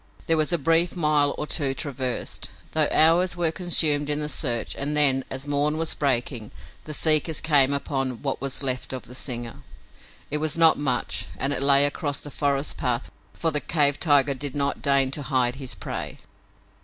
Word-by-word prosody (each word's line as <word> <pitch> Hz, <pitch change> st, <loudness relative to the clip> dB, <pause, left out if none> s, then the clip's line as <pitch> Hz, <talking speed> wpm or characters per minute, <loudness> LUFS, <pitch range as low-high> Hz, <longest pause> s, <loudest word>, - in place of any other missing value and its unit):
There 165 Hz, -, +2 dB
was 155 Hz, +1 st, 0 dB
a 175 Hz, -, +3 dB
brief 165 Hz, +4 st, +1 dB
mile 150 Hz, -4 st, +2 dB
or -, -, -3 dB
two 140 Hz, -3 st, -1 dB
traversed, 130 Hz, -4 st, -4 dB, 0.2 s
though 155 Hz, -2 st, +2 dB
hours 175 Hz, +3 st, +3 dB
were 170 Hz, -2 st, 0 dB
consumed 155 Hz, -4 st, +1 dB
in 150 Hz, 0 st, -1 dB
the 150 Hz, 0 st, -3 dB
search, 120 Hz, -7 st, -1 dB
and 145 Hz, +2 st, -3 dB
then, 135 Hz, -3 st, +4 dB
as 135 Hz, +2 st, -5 dB
morn 145 Hz, +2 st, 0 dB
was 165 Hz, 0 st, +1 dB
breaking, 120 Hz, -5 st, -2 dB, 0.4 s
the 155 Hz, -, -6 dB
seekers 155 Hz, 0 st, +3 dB
came 145 Hz, -4 st, +3 dB
upon 135 Hz, -3 st, -2 dB
what 135 Hz, -2 st, -3 dB
was 135 Hz, +1 st, -2 dB
left 130 Hz, -1 st, -2 dB
of 130 Hz, -, -5 dB
the 125 Hz, -, -12 dB
singer. 120 Hz, -3 st, -4 dB, 0.7 s
It 150 Hz, -, -1 dB
was 155 Hz, +1 st, -1 dB
not 165 Hz, -2 st, +5 dB
much 130 Hz, -, -1 dB
and 135 Hz, +8 st, 0 dB
it -, -, -1 dB
lay 140 Hz, 0 st, +6 dB
across 145 Hz, -1 st, -2 dB
the 145 Hz, -, -8 dB
forest 140 Hz, 0 st, -2 dB
pathway, 120 Hz, -, -3 dB, 0.2 s
for 165 Hz, -, 0 dB
the 150 Hz, -, 0 dB
cave 145 Hz, -3 st, +1 dB
tiger 145 Hz, -3 st, +3 dB
did 140 Hz, +1 st, -6 dB
not 140 Hz, 0 st, -1 dB
deign 140 Hz, -2 st, +2 dB
to 145 Hz, -, -3 dB
hide 130 Hz, -2 st, 0 dB
his 130 Hz, -3 st, -3 dB
prey. -, -, -6 dB
145 Hz, 190 wpm, -24 LUFS, 135-155 Hz, 0.7 s, lay